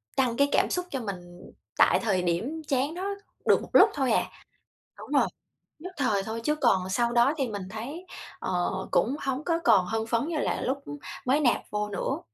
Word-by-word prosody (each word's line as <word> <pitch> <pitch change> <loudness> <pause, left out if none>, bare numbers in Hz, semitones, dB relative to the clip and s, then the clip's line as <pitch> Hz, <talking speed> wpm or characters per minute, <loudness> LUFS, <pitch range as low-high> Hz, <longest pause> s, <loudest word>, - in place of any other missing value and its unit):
tăng 245 -3 +1
cái 280 0 +3
cảm - - +3
xúc 360 0 -1
cho 265 -3 -3
mình 180 -4 -8 0.3
tại - - +5
thời 195 -5 +1
điểm 200 - -1
chán 275 +2 0
đó 360 +2 -5 0.4
được - - +4
một - - -9
lúc - - +8
thôi 265 -4 0
à. - - +3 0.7
Đúng - - -11
rồi, - - +4 0.5
nhất 365 +4 -8
thời 220 -8 +1
thôi, 225 +3 -4
chứ 300 - +2
còn 215 -11 +2
sau 235 +5 +1
đó 240 +5 +4
thì 270 -5 -1
mình 200 -3 -5
thấy, 280 +12 -7 0.3
ờ, 175 -1 -1 0.2
cũng 260 +6 +2
hổng 270 +2 -2
có 335 -1 +1
còn 185 - +5
hưng 225 +3 -2
phấn 230 +6 0
như 335 - -2
là - - -1
lúc 265 +2 -1 0.5
mới 270 +4 +3
nạp 250 -5 +3
vô 210 0 -2
nữa. 200 - -2
240 Hz, 205 wpm, -27 LUFS, 205-285 Hz, 0.7 s, lúc